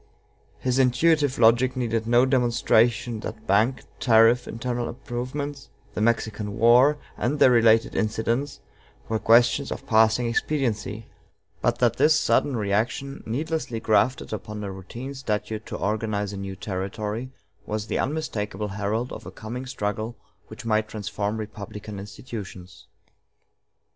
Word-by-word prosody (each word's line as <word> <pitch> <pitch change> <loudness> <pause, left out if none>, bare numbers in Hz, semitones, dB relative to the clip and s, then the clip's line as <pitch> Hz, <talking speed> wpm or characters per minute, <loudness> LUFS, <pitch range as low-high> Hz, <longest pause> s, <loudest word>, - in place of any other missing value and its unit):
His 130 0 0
intuitive 140 +2 +3
logic 120 +3 +4
needed 115 -2 -1
no 120 +2 +5
demonstration 120 -3 +2
that 110 0 -7
bank, 110 +7 +2 0.2
tariff, 115 +1 +5
internal 120 +1 -3
improvements, 135 +3 -5 0.2
the - - -3
Mexican 110 -2 0
War, 125 +6 +6 0.2
and 140 +5 0
their 130 - +6
related 115 -1 +4
incidents, 115 +6 -1 0.5
were 110 -1 -1
questions 120 +5 +4
of - - -5
passing 110 +1 +4
expediency; 115 -4 -1 0.6
but 120 -1 +1
that 120 -2 +2
this 155 0 +5
sudden 135 -4 +2
reaction, 110 +7 -1
needlessly 145 -1 -2
grafted 110 +3 +1
upon 105 0 -6
a 100 - -4
routine 115 +8 -7
statute 110 -4 -3
to - - -5
organize 105 -1 -1
a - - -5
new 95 0 -5
territory, 105 +5 -4 0.4
was 105 0 -2
the - - -2
unmistakable 110 -8 -2
herald 105 +5 -2
of - - -9
a - - -7
coming 125 +4 -7
struggle 110 -1 -3 0.3
which - - -10
might 110 -1 +1
transform 105 0 -3
republican 105 -1 -7
institutions. 100 -2 -9
115 Hz, 130 wpm, -25 LUFS, 105-125 Hz, 0.6 s, War